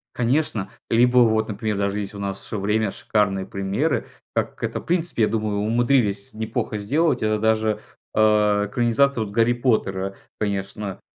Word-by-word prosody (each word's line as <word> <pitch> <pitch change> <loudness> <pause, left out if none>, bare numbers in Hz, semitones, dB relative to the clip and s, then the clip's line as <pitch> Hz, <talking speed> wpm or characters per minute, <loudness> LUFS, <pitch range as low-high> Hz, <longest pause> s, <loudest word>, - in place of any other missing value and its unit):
Конечно, 120 -5 0 0.2
либо 125 +2 +4
вот, 110 -2 +4
например, 105 0 -2
даже 100 +1 0
есть 100 0 -5
у 100 - -8
нас 100 -1 -5
время, 105 +1 0
шикарные 95 -3 0
примеры, 100 +11 -1 0.3
так - - -1
как - - -13
это, - - -4
в - - -13
принципе, 170 -8 +1
я - - +4
думаю, 105 -1 -1
умудрились 110 -1 +1
неплохо 110 -1 -3
сделать. 145 +11 +1
Это 110 0 +1
даже, 110 -1 +1 0.3
э, - - +1 0.5
экранизация 120 +2 +2
вот 100 - -9
"Гарри 115 +2 +3
Поттера", 100 -6 0 0.2
конечно. 100 -1 -3
110 Hz, 155 wpm, -23 LUFS, 100-120 Hz, 0.5 s, либо